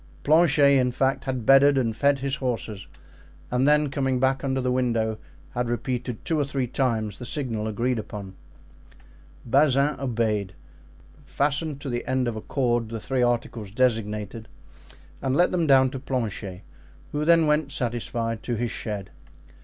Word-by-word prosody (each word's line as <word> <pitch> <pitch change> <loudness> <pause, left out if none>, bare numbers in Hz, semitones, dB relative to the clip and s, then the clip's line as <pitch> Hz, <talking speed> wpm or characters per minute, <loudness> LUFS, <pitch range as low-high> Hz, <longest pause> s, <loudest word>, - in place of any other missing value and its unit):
Planchet, 145 -3 +5
in 125 -1 +1
fact, 135 +2 0
had 130 -4 -3
bedded 135 +1 +6
and 115 -4 0
fed 140 +4 +3
his 135 +1 -2
horses, 115 -7 -4 0.6
and 125 +2 +2
then 150 -1 +3
coming 135 -2 0
back 135 +1 +1
under 135 -1 0
the 125 -1 0
window 115 -4 0 0.3
had 120 -1 -2
repeated 120 -1 -3
two 160 -2 0
or - - +3
three 135 -2 -2
times 115 -5 -1
the - - -7
signal 120 -5 -2
agreed 115 +3 -1
upon. 100 -3 -7 1.1
Bazin 140 +2 +3
obeyed, 110 -7 -1 0.7
fastened 145 +1 -1
to 140 - -5
the 120 0 -2
end 130 -1 +1
of 120 - -2
a 110 - -5
cord 120 -4 0
the 115 0 -5
three 130 +3 -1
articles 120 -3 -1
designated 110 -2 -1 0.7
and 135 0 0
let 175 +4 +3
them 170 -3 +1
down 130 -2 +5
to 135 - -5
Planchet, 110 -8 -4 0.5
who 150 0 -1
then 165 0 +5
went 150 -1 +1
satisfied 115 -2 -3
to 120 - -3
his 120 +1 -2
shed. 105 -4 -5
125 Hz, 160 wpm, -25 LUFS, 115-140 Hz, 1.1 s, bedded